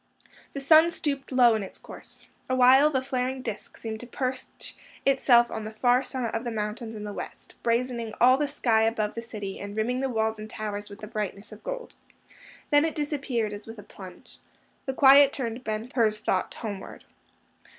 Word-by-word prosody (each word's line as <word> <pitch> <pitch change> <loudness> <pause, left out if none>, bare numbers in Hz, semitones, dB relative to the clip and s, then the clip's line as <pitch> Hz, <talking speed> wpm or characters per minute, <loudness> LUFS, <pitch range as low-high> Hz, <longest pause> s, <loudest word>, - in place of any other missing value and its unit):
The 275 - -4
sun 315 +4 +6
stooped 280 -5 -3
low 245 -3 +6
in 220 - 0
its 195 - -8
course. - - -12 0.2
Awhile 255 +3 +6
the 260 -3 -1
flaring 260 0 -2
disk 225 -4 -6
seemed 220 -1 -5
to 245 - -9
perch 255 +1 -5 0.3
itself 250 -3 +4
on 220 - -4
the 215 - -6
far 245 +3 +3
summit 255 -4 -4
of 225 - -2
the 240 - -3
mountains 220 +1 -4
in 210 - -7
the 205 -1 -5
west, - - -8
brazening 235 -1 -1
all 255 +2 +7
the 290 +2 0
sky 235 -6 +2
above 220 -1 0
the 230 - -5
city, 210 -4 -6
and 200 +1 -7
rimming 245 +4 0
the 270 0 -1
walls 220 -2 -1
and 215 0 -7
towers 210 -2 -5
with 200 +1 -12
the 215 - -7
brightness 210 -2 -5
of - - -12
gold. - - -6 0.8
Then 290 0 +6
it 320 -1 -1
disappeared 270 -8 -2
as 205 +1 -9
with 225 0 -9
a 205 - -10
plunge. 185 -2 -13 0.5
The 265 - -1
quiet 275 +1 +7
turned 240 -1 -4
Ben 220 +2 -4
Hur's 215 -3 +2
thought 190 -3 -1
homeward. 200 -4 -7
235 Hz, 190 wpm, -27 LUFS, 215-265 Hz, 0.8 s, all